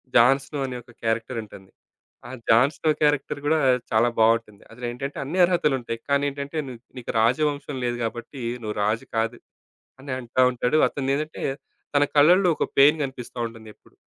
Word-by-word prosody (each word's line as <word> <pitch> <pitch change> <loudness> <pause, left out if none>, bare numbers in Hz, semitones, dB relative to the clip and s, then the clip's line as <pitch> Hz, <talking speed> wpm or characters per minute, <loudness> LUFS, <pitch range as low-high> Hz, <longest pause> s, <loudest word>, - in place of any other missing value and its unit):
'Jon Snow' 135 +4 +4
అనే 125 -1 -5
ఒక 120 0 -18
character 115 +2 -1
ఉంటుంది. 95 -2 -14 0.6
ఆ - - -8 0.2
'జాన్‍స్నో' 140 +7 +4
క్యారెక్టర్ 145 -1 +1
గూడా 160 +2 +3 0.3
చాలా 115 +2 +4
బావుంటుంది. 110 -2 +2
అసలేంటంటే 125 +4 -5
అన్ని 165 +7 -3
అర్హతలుంటాయి. 135 -10 0
కానీ 140 0 +2
ఏంటంటే 140 +3 -6
"నుకు 120 -1 -11 0.2
నీకు 120 - -5
రాజవంశం 145 +3 0
లేదు 120 0 -1
గాబట్టి 120 +4 -5 0.2
నువ్వు 105 -1 -4
రాజు 110 +2 -1
కాదు." 115 +1 -1 0.6
అని 135 -1 -5
అంటా 130 +1 +1
ఉంటాడు. 125 +4 +1
అతను 135 -1 -2
ఏదంటే 155 +1 -5 0.5
తన 145 - +5
కళ్ళలో 175 +6 +6
ఒక - - +1
పెయిన్ 145 +3 +7
గనిపిస్తా 130 -2 -7
ఉంటుందెప్పుడు. 110 -2 -15
130 Hz, 150 wpm, -24 LUFS, 115-145 Hz, 0.6 s, పెయిన్